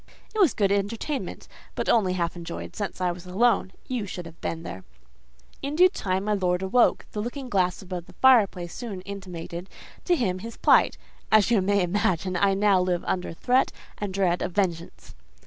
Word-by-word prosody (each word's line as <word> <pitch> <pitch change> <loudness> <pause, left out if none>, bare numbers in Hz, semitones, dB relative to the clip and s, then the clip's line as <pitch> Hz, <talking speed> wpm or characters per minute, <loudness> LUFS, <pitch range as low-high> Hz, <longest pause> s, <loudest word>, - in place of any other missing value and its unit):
"It 435 - -3
was 355 - +4
good 200 -2 +2
entertainment; 220 +8 -2 0.3
but - - -2
only 195 -6 +3
half 170 -2 -1
enjoyed, 170 -1 -7
since 205 -2 -4
I 180 -1 +1
was 175 +1 -9
alone: 200 +1 +2 0.2
you 240 -6 -2
should 180 -2 -6
have 165 0 -12
been 165 0 -3
there. 95 - -7 0.8
"In 280 +2 -3
due 365 +3 +7
time 190 - -2
my 210 +1 0
lord 180 -2 0
awoke: 235 +6 +3
the 210 - -4
looking 250 +3 -5
glass 185 -3 +1
above 180 -2 -6
the - - -15
fireplace 205 -9 +4
soon 210 -7 -6
intimated 185 -2 -7 0.4
to 355 - +3
him 190 - -1
his 230 +4 -8
plight: - - +4 0.3
as 215 +1 +5
you 220 -5 +4
may 200 0 +2
imagine, 185 0 0
I 195 +2 +3
now 200 -2 +4
live 180 -1 0
under 180 -1 -2
threat 250 +10 +2 0.3
and 205 -2 -3
dread 185 -2 +1
of 180 - -3
vengeance. 175 -4 -2
195 Hz, 185 wpm, -26 LUFS, 180-220 Hz, 0.8 s, due